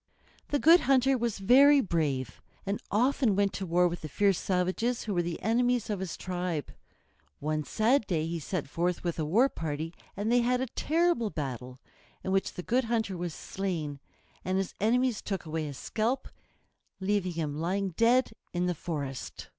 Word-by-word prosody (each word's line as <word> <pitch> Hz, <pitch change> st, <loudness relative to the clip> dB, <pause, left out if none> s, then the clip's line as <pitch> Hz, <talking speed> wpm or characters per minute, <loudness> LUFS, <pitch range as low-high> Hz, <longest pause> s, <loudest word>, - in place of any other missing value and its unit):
The 290 Hz, -, +1 dB
Good 330 Hz, +5 st, +7 dB
Hunter 270 Hz, 0 st, +4 dB
was 235 Hz, -3 st, -1 dB
very 275 Hz, +8 st, +6 dB
brave, 155 Hz, -, -1 dB, 0.2 s
and 200 Hz, +1 st, -2 dB
often 245 Hz, 0 st, +2 dB
went 200 Hz, 0 st, +2 dB
to 190 Hz, -, -4 dB
war 175 Hz, +1 st, +4 dB
with 175 Hz, 0 st, -4 dB
the 155 Hz, -, -6 dB
fierce 200 Hz, +3 st, +2 dB
savages 190 Hz, +6 st, 0 dB
who 210 Hz, -, -3 dB
were 175 Hz, -, +2 dB
the 170 Hz, -1 st, -4 dB
enemies 245 Hz, +1 st, +1 dB
of 205 Hz, -, -2 dB
his 185 Hz, -4 st, -4 dB
tribe. 180 Hz, -4 st, -3 dB, 0.7 s
One 155 Hz, +1 st, -1 dB
sad 225 Hz, -, +2 dB
day 160 Hz, -4 st, 0 dB
he 165 Hz, +1 st, -3 dB
set 160 Hz, -1 st, -3 dB
forth 175 Hz, +4 st, -1 dB
with 170 Hz, -2 st, -2 dB
a 155 Hz, -, 0 dB
war 220 Hz, -, +4 dB
party, 160 Hz, -, -4 dB, 0.2 s
and 210 Hz, +3 st, -1 dB
they 245 Hz, -, +5 dB
had 250 Hz, +1 st, +2 dB
a 260 Hz, -, 0 dB
terrible 310 Hz, -3 st, +1 dB
battle, 130 Hz, -, -5 dB, 0.5 s
in 190 Hz, -, -2 dB
which 195 Hz, 0 st, +1 dB
the 180 Hz, -, -6 dB
Good 250 Hz, +5 st, +1 dB
Hunter 220 Hz, -4 st, -1 dB
was 175 Hz, -2 st, -4 dB
slain, 165 Hz, -7 st, -4 dB, 0.4 s
and 185 Hz, +1 st, 0 dB
his 195 Hz, -1 st, -2 dB
enemies 245 Hz, +2 st, +2 dB
took 195 Hz, -5 st, -4 dB
away 160 Hz, 0 st, -3 dB
his 140 Hz, -3 st, -6 dB
scalp, 235 Hz, +4 st, -1 dB, 0.7 s
leaving 190 Hz, -2 st, 0 dB
him 155 Hz, -3 st, -3 dB
lying 190 Hz, +4 st, 0 dB
dead 230 Hz, +8 st, +3 dB, 0.2 s
in 175 Hz, 0 st, 0 dB
the 180 Hz, -, +1 dB
forest. 145 Hz, -5 st, -5 dB
190 Hz, 180 wpm, -29 LUFS, 165-235 Hz, 0.7 s, Good